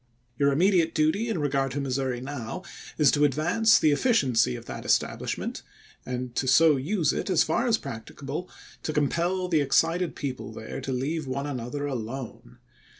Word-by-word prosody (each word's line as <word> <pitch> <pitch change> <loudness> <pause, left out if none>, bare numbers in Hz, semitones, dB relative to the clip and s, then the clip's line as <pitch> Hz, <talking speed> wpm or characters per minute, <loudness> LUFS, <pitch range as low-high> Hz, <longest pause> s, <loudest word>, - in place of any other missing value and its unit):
Your 140 0 +4
immediate 170 +2 +3
duty 160 +10 +1
in 225 - -1
regard 135 -3 0
to 145 - -2
Missouri 130 -2 -2
now 135 +5 -6 0.3
is 150 -3 +5
to 145 - +2
advance 170 - +4
the 155 - +3
efficiency 135 - +2
of - - -9
that - - -7
estab - - +1
lishment, - - -4 0.5
and 125 -1 -4
to 130 - 0
so 155 +3 +6
use 155 +3 0
it - - -3
as 185 - +4
far 255 - 0
as 230 -2 +3
practicable, 135 - -7 0.3
to 155 - -3
compel 170 +5 0
the 160 -4 +2
excited 165 +5 +1
people 125 -6 -5
there 110 +4 -7
to 135 - -4
leave 140 +4 -2
one 140 +2 -3
another 145 +1 -4
alone. 120 - -6
145 Hz, 170 wpm, -26 LUFS, 130-165 Hz, 0.5 s, so